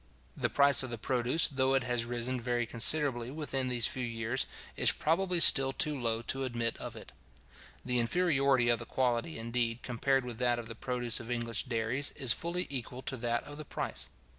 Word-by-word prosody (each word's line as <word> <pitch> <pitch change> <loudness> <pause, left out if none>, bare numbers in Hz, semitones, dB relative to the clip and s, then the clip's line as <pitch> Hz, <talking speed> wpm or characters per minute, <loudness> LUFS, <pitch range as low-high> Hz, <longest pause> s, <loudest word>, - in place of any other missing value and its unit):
The - - -1
price 140 -1 +6
of 130 - -4
the 120 - -4
produce, 125 +6 +1
though 135 -1 +1
it 135 - +1
has 120 -1 -1
risen 120 +1 -1
very 120 0 -1
considerably 120 +1 +3
within 135 -3 -3
these 120 -3 +1
few 130 - -1
years, 115 +2 -2 0.3
is - - +4
probably 180 +3 0
still 135 -5 +6
too 150 +2 +3
low 115 -3 -2
to 135 +3 -2
admit 120 -2 -2
of - - -7
it. - - -11 0.7
The 125 -1 +1
inferiority 140 -2 +2
of 120 -1 +3
the 115 - -8
quality, 125 +4 -1
indeed, 115 +1 -2
compared 135 +2 0
with 120 -2 -7
that 120 -1 +2
of 120 -1 -6
the 115 - -7
produce 120 0 -2
of 120 - -9
English 120 -1 -2
dairies, 125 +3 0
is 130 -4 +3
fully 175 +2 -2
equal 130 -1 -5
to 130 - -4
that 120 0 -2
of 145 0 -10
the - - -5
price. - - -3
125 Hz, 195 wpm, -31 LUFS, 120-135 Hz, 0.7 s, price